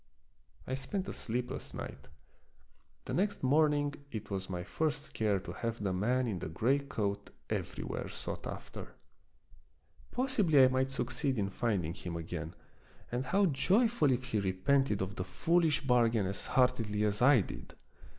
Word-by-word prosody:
I 130 - -4
spent 185 +9 -3
a - - -4
sleepless 125 +2 -3
night. - - -7 1.0
The - - -4
next 200 -1 0
morning 145 +1 +3 0.2
it 110 -2 -6
was 95 -1 -3
my 90 -1 -3
first 150 - -2
care 105 -3 +1
to - - -7
have 115 -2 -3
the 95 -2 0
man 120 +7 +1
in 100 -6 -2
the 80 - -4
gray 120 - +2
coat 105 -7 -3 0.2
everywhere - - -3
sought - - -5
after. - - -8 1.1
Possibly 215 - +4
I 130 - +7
might 130 +1 +1
succeed 135 0 -1
in 100 -2 0
finding 95 -8 0
him 90 -2 -6
again, 85 0 -5 0.6
and 125 +2 -1
how 195 +9 +3
joyful 190 - +3
if 125 0 0
he 110 -4 -1
repented 100 +3 +2
of 95 +1 -6
the 90 - -1
foolish 165 - +2
bargain 120 -5 +3
as 95 +1 -3
heartily 115 -5 +2
as 105 +1 0
I 125 -2 +7
did. - - -8
125 Hz, 155 wpm, -32 LUFS, 100-145 Hz, 1.1 s, I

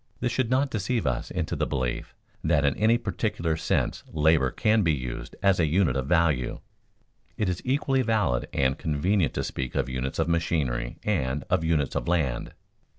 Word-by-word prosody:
This 120 - 0
should 130 -3 0
not 135 +1 +2
deceive 110 +2 -1
us - - -1
into - - -2
the - - -1
belief 65 -3 -3 0.3
that 75 - +2
in 70 - +2
any 110 +2 +3
peculiar 105 -8 -1
sense 80 - -1
labor 75 -3 +3
can 110 - +2
be 85 -5 +3
used 60 -4 -5
as 100 -2 +4
a 80 - +3
unit 80 -4 +2
of 65 0 -1
value. 80 -7 +1 0.8
It 105 -4 0
is 90 -1 -2
equally 135 0 +1
valid 105 - +1
and 65 0 +1
convenient 80 +2 +1
to - - -1
speak 65 -1 -4
of - - 0
units 65 +1 -3
of 80 - +1
machinery 75 -8 -1
and 75 -9 0
of 90 -2 +2
units 80 -4 +1
of - - -2
land. 80 -8 0
80 Hz, 180 wpm, -26 LUFS, 65-105 Hz, 0.8 s, as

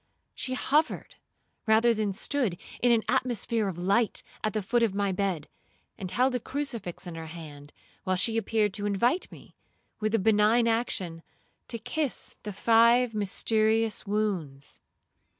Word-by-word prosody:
She 255 -1 -3
hovered, 300 +4 0 0.5
rather 225 +2 +5
than 215 -2 -1
stood, 215 -2 -1 0.2
in 245 - +4
an 230 -2 +3
atmosphere 230 -3 0
of 185 -3 -4
light 200 +6 +1 0.2
at 215 - 0
the 215 - -1
foot 240 +5 +1
of 220 -4 +1
my 200 -1 +1
bed, 185 -5 -1 0.5
and 185 - -6
held 255 +6 +2
a 250 - 0
crucifix 235 - -5
in 175 - -6
her 165 0 -7
hand, 150 -3 -10 0.3
while 185 - 0
she 220 +5 +1
appeared 215 -2 +1
to 205 0 -1
invite 235 - +1
me, - - -14 0.5
with 215 +1 0
a - - +4
benign 220 +3 +4
action, 195 -8 -1 0.5
to 230 - -3
kiss 280 +5 -3
the 210 - -5
five 230 +3 +4
mysterious 220 +2 +1
wounds. 185 -10 -2
215 Hz, 150 wpm, -28 LUFS, 190-235 Hz, 0.5 s, rather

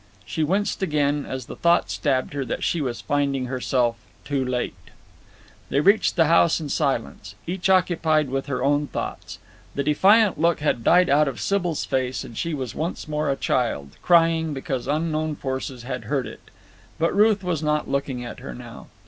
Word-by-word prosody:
She 160 - -2
winced 195 +7 0
again 150 -4 0
as 130 -2 -5
the - - -8
thought 170 0 +2
stabbed 135 -3 0
her 140 -1 -2
that 120 - -4
she 170 - 0
was 125 -4 -3
finding 140 -2 0
herself 125 -2 0 0.3
too 140 -2 -1
late. 125 -1 -2 1.0
They 140 - +1
reached 200 +8 +3
the 165 -2 +4
house 165 +1 +4
in 155 -3 -5
silence, 115 - -2
each 180 +2 -2
occupied 160 -6 +2
with 135 +1 -2
her 130 -3 -2
own 145 +1 +2
thoughts. - - -5 0.4
The 140 - 0
defiant 195 +7 +4
look 170 0 +3
had 145 -6 0
died 180 +7 +5
out 150 +1 +4
of 130 -6 -4
Sybil's 175 - -1
face 130 0 -1
and 120 -4 -10
she 165 +6 -2
was 130 -5 -5
once 165 +1 -4
more 150 -1 -1
a 135 - +1
child, 115 - -1
crying 165 -3 +3
because 130 -1 -4
unknown 155 +1 -1
forces 130 -2 -4
had 125 -2 -5
hurt 135 +2 -1
it. - - -10 0.6
But 165 +3 0
Ruth 210 -1 +4
was 175 -4 -1
not 150 -1 0
looking 135 -3 -2
at 120 - -8
her 60 - -8
now. - - -11
145 Hz, 180 wpm, -23 LUFS, 130-165 Hz, 1.0 s, died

